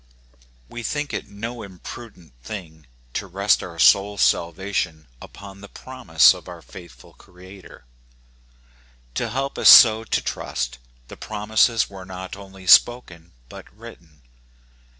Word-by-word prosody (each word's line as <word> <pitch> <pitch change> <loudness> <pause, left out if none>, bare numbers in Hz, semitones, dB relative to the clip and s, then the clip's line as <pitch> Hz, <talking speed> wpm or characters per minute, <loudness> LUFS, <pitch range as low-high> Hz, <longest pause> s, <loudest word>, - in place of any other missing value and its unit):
We 120 - -9
think 145 +4 -4
it - - -5
no 115 +4 -7
imprudent 95 - -12
thing 80 - -10 0.3
to 100 - -4
rest 100 +2 +1
our 85 -2 -10
souFs 100 +9 +3
salvation 85 -2 -1 0.2
upon 100 -1 -13
the 100 - -11
prom 130 -4 -13
ise 80 0 +6
of - - -13
our - - -11
faithful 85 -9 -15
Creator. 90 -5 -16 1.3
To - - -3
help 135 +2 -4
us - - +6
so 110 -2 +8
to - - -2
trust, 60 +1 -5 0.3
the - - -12
promises 110 +2 0
were 95 -2 -12
not 95 0 -9
only 95 -1 -14
spoken 90 - +3
but - - -13
written. 75 -5 -15
95 Hz, 130 wpm, -21 LUFS, 85-110 Hz, 1.3 s, so